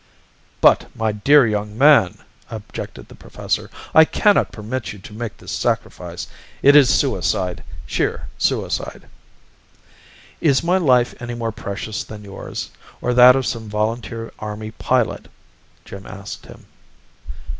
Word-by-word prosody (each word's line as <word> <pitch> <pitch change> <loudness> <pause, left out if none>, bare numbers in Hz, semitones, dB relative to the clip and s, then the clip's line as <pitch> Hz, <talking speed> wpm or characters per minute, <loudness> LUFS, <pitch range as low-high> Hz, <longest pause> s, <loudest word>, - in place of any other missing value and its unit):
"But, - - +5
my 110 -1 0
dear 135 +7 +5
young 105 -1 -2
man!" 140 -9 +5 0.3
objected 110 -2 -8
the - - -14
professor. - - -4 0.2
"I 160 - +9
cannot 205 +5 +2
permit 110 +4 -5
you - - -11
to 95 +2 -12
make 110 -1 -6
this - - -9
sacrifice. - - -3 0.4
It 140 +1 +7
is 140 -4 +7
suicide, 90 -7 0 0.2
sheer 65 - -2
suicide." - - -2 1.3
"Is 140 -2 +2
my 180 +3 +2
life 125 -7 +3
any 120 0 -5
more 115 -1 -3
precious 105 0 -5
than 105 -1 -10
yours, 100 -1 -7 0.3
or 125 - -1
that 125 +1 +8
of 135 -1 0
some 110 -2 -4
volunteer 115 +2 -3
Army 110 0 -6
pilot?" - - -1 0.6
Jim 100 0 -10
asked 100 -2 -9
him. - - -14
115 Hz, 135 wpm, -20 LUFS, 105-130 Hz, 1.3 s, I